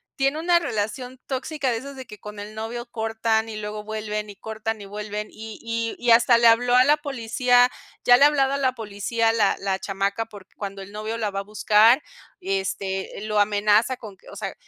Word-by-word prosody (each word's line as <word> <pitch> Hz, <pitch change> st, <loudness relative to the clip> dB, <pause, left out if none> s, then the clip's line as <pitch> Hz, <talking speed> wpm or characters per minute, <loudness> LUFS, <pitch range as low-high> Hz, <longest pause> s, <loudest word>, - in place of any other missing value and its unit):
tiene 275 Hz, +2 st, +1 dB
una 345 Hz, +1 st, +3 dB
relación 250 Hz, 0 st, -3 dB
tóxica 270 Hz, 0 st, -2 dB
de 230 Hz, -, -1 dB
esas 275 Hz, +4 st, -8 dB
de 260 Hz, -1 st, -8 dB
que 210 Hz, -, -11 dB
con 210 Hz, 0 st, -9 dB
el 210 Hz, +1 st, -8 dB
novio 225 Hz, +2 st, -5 dB
cortan 225 Hz, 0 st, 0 dB
y 220 Hz, -, -6 dB
luego 210 Hz, 0 st, -5 dB
vuelven, 215 Hz, -1 st, -4 dB
y 205 Hz, -, -10 dB
cortan 220 Hz, +1 st, -5 dB
y -, -, -8 dB
vuelven, 210 Hz, +1 st, -5 dB
y 220 Hz, 0 st, -9 dB
y 230 Hz, 0 st, -2 dB
y 240 Hz, -1 st, +2 dB
hasta 235 Hz, +1 st, +6 dB
le 235 Hz, -, +5 dB
habló 245 Hz, +2 st, +4 dB
a 250 Hz, -, +7 dB
la 295 Hz, +3 st, +4 dB
policía, 245 Hz, -3 st, +2 dB, 0.3 s
ya 245 Hz, 0 st, +7 dB
le 280 Hz, -, +7 dB
ha -, -, +9 dB
hablado 275 Hz, -2 st, +2 dB
a -, -, 0 dB
la 260 Hz, -2 st, +1 dB
policía 225 Hz, 0 st, -1 dB
la 215 Hz, -3 st, +2 dB
la 195 Hz, -1 st, -1 dB
chamaca 200 Hz, +3 st, -2 dB
porque 205 Hz, -4 st, -14 dB
cuando 195 Hz, -1 st, -6 dB
el 195 Hz, -, -10 dB
novio 215 Hz, +2 st, -4 dB
la 220 Hz, -2 st, -1 dB
va 195 Hz, -, -3 dB
a 200 Hz, -, -4 dB
buscar, 215 Hz, +5 st, +4 dB, 0.4 s
este, 190 Hz, 0 st, -2 dB, 0.2 s
lo 210 Hz, -1 st, +1 dB
amenaza 210 Hz, +4 st, +3 dB
con 210 Hz, -5 st, -11 dB
que -, -, -23 dB
o -, -, -11 dB
sea, -, -, -5 dB
220 Hz, 215 wpm, -24 LUFS, 210-245 Hz, 0.4 s, ha